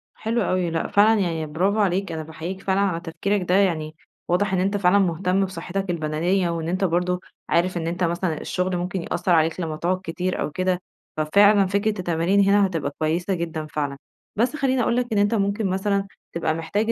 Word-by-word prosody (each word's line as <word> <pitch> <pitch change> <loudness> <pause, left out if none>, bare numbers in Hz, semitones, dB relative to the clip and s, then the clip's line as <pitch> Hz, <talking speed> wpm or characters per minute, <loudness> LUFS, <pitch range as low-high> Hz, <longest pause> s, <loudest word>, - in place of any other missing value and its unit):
حلو 230 +2 -1
أوي 185 -3 0
لأ، 165 0 -1
فعلًا 215 +2 +4
يعني 165 -4 -1
براڤو 195 +6 +1
عليك، 195 -2 +1
أنا 160 -1 -4
باحيِّيك 165 +4 -6
فعلًا 190 0 0
على 185 -4 0
تفكيرك 180 +4 -2
ده. 180 - +4
يعني 160 -6 +1 0.3
واضح 190 +3 +1
إن 185 - +2
أنتَ 195 +2 +1
فعلًا 195 0 +4
مُهتم 185 +1 +1
بصحتك 190 +1 -4
البدنية، 170 +3 0
وإن 165 -1 -3
أنتَ 185 +3 -1
برضه 180 0 +1 0.3
عارف 175 +1 +1
إن 165 -1 -2
أنتَ 175 +2 -2
مثلًا 170 -1 -1
الشغل 180 0 -1
ممكن 180 +1 -3
يأثّر 175 +2 -2
عليك 165 0 +3
لما 160 -3 -3
تقعد 180 +3 0
كتير 180 +2 -2
أو - - -2
كده، 185 +3 0 0.4
ففعلًا 200 +6 +5
فكرة 200 +2 0
التمارين 175 +2 +1
هنا 200 +1 +4
هتبقى 165 -7 -2
كويسة 170 +5 0
جدًا 165 -3 -3
فعلًا. 145 -2 -3 0.4
بس 240 +7 +1
خليني 265 -3 +1
أقول 235 - +1
لَك، 245 0 0
إن - - +1
أنتَ 205 +2 +3
ممكن 200 +1 0
مثلًا 195 +1 0 0.3
تبقى 165 -1 0
محتاج 205 +8 -1
180 Hz, 195 wpm, -23 LUFS, 165-200 Hz, 0.4 s, ففعلًا